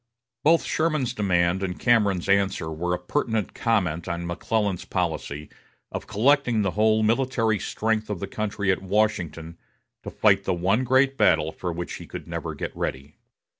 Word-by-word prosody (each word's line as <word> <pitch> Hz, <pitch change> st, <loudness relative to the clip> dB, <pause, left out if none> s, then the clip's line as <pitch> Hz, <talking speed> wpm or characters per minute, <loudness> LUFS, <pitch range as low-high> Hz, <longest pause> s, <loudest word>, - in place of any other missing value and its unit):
Both 165 Hz, +2 st, +4 dB
Sherman's 155 Hz, -6 st, 0 dB
demand 90 Hz, -3 st, +1 dB
and 90 Hz, -2 st, -3 dB
Cameron's 105 Hz, -7 st, +2 dB
answer 100 Hz, -4 st, +1 dB
were 90 Hz, +3 st, -1 dB
a -, -, -4 dB
pertinent 110 Hz, +3 st, -2 dB
comment 90 Hz, -8 st, 0 dB
on 85 Hz, 0 st, -3 dB
McClellan's 100 Hz, +2 st, -1 dB
policy 80 Hz, -4 st, -3 dB, 0.4 s
of -, -, -5 dB
collecting 120 Hz, 0 st, +2 dB
the 95 Hz, -, 0 dB
whole 110 Hz, +1 st, +3 dB
military 115 Hz, -2 st, +1 dB
strength 110 Hz, 0 st, -1 dB
of 105 Hz, -4 st, -3 dB
the -, -, -3 dB
country 100 Hz, -2 st, -1 dB
at 95 Hz, -, -1 dB
Washington 90 Hz, -5 st, -1 dB, 0.4 s
to -, -, -7 dB
fight 95 Hz, -2 st, +3 dB
the 90 Hz, -, 0 dB
one 95 Hz, +8 st, +1 dB
great 130 Hz, +2 st, +3 dB
battle 80 Hz, +1 st, +3 dB
for 90 Hz, +1 st, -4 dB
which 85 Hz, +1 st, -5 dB
he -, -, -10 dB
could -, -, -8 dB
never -, -, -4 dB
get -, -, -5 dB
ready. 70 Hz, +3 st, -4 dB
100 Hz, 165 wpm, -25 LUFS, 85-110 Hz, 0.4 s, Both